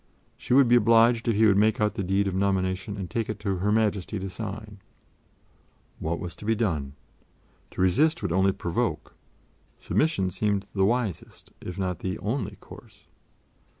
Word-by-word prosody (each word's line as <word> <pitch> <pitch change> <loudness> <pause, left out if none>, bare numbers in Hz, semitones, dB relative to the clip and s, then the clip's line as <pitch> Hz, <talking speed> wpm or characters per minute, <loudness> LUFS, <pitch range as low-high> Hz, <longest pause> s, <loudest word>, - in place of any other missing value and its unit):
She 125 - -1
would 135 -2 +6
be 120 +1 +6
obliged 115 +1 +4
if 115 - +2
he 110 +2 +4
would 100 -2 +4
make 110 +1 +3
out 105 -1 +1
the 110 - -3
deed 95 +2 +1
of 95 - -2
nomination 95 +1 -1
and 95 -2 -4
take 110 +6 -3
it 110 - -3
to 100 -3 -1
Her 100 +4 0
Majesty 105 -2 0
to 95 0 -5
sign. 105 0 -7 1.2
What 85 +2 -2
was 90 -1 -6
to - - -11
be 115 +1 +2
done? 80 -11 -2 0.8
To - - -5
resist 125 - +2
would 95 - -1
only 95 +2 +3
provoke; 85 -2 -3 0.6
submission 100 - 0
seemed 100 +1 -1
the 95 -1 +2
wisest, 115 -5 -3
if 90 +1 -7
not 90 -3 -2
the 95 +2 -3
only 105 -2 -3
course. - - -15
100 Hz, 175 wpm, -26 LUFS, 95-110 Hz, 1.2 s, would